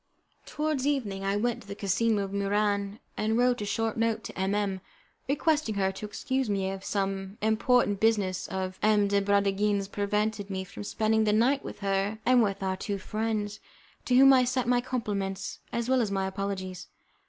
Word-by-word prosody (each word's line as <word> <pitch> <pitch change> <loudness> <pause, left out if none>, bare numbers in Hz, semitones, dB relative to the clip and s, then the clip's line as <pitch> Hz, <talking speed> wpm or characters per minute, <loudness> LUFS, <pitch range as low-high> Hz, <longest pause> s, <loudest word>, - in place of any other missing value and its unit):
Towards 300 -3 -1
evening 215 -10 -1
I 195 +1 0
went 235 +2 -1
to - - -16
the 200 - -6
casino 205 +1 +1
of 195 - -5
Muran, 200 0 0 0.2
and 220 +1 0
wrote 245 -1 +2
a - - -2
short 225 +2 -1
note 230 -1 0
to - - -8
M 190 +1 0
M, 195 -2 -1 0.5
requesting 290 -5 +1
her 190 -1 +1
to 195 +2 -7
excuse 260 +4 -2
me 195 -1 0
if 195 0 -7
some 195 0 -2
important 220 -1 +2
business 205 -5 +1
of 185 0 -4
M. 210 -1 +4
de 200 0 +2
Bragadin's 200 0 +1
prevented 205 0 -1
me 190 -1 -3
from 195 +2 -9
spending 220 +1 +1
the 210 - +2
night 255 +6 +3
with - - -8
her 195 +2 0
and 250 0 +5
with 200 -2 0
our 190 0 -1
two 200 +1 -3
friends, 215 +1 -3 0.5
to 250 - +2
whom 270 +1 +8
I 255 -1 +5
sent 250 0 0
my 245 0 +3
compliments 200 -6 -3
as 235 0 -2
well 260 -1 +3
as 220 - 0
my 195 -1 -1
apologies. 190 -2 -4
205 Hz, 190 wpm, -28 LUFS, 195-230 Hz, 0.5 s, whom